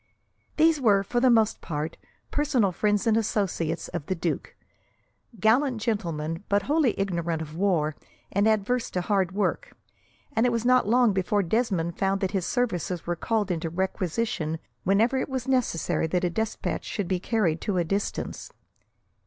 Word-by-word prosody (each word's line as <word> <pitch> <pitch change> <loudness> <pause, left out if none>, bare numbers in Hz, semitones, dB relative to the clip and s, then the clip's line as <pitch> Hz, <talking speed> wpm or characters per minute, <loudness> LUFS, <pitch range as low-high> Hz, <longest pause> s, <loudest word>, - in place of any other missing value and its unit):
These 315 -1 +4
were, 200 -5 +4
for 240 +5 -1
the 255 +1 +4
most 225 -3 +3
part, 155 0 -4 0.4
personal 275 -10 +2
friends 210 +4 +1
and 225 -2 +3
associates 195 -7 -1
of 170 -5 -5
the 185 - 0
duke; 165 -1 -3 0.8
gallant 240 +4 +3
gentlemen, 170 -6 -2
but 200 0 +2
wholly 295 -7 +1
ignorant 170 -4 -1
of 155 -1 -7
war, 165 -5 +1 0.4
and 200 +2 +2
adverse 220 +3 +1
to 180 - -2
hard 190 -1 +1
work, 210 - -1 0.6
and 230 +2 +3
it - - +1
was 230 0 -1
not 255 -3 +4
long 240 -1 +4
before 195 +2 +1
Desmond 175 -4 0
found 195 0 +1
that 190 - 0
his 190 -3 -1
services 180 -8 -1
were 175 - -1
called 210 +2 -1
into 165 -1 -2
requisition 185 -1 -2 0.3
whenever 225 +7 +3
it - - -3
was 260 -2 -3
necessary 250 -11 +1
that 180 +2 0
a 175 - +1
despatch 220 +4 -2
should 200 -4 -3
be 185 0 0
carried 180 -6 0
to 200 -3 -1
a 175 - +3
distance. 195 +4 -3
200 Hz, 165 wpm, -26 LUFS, 175-230 Hz, 0.8 s, These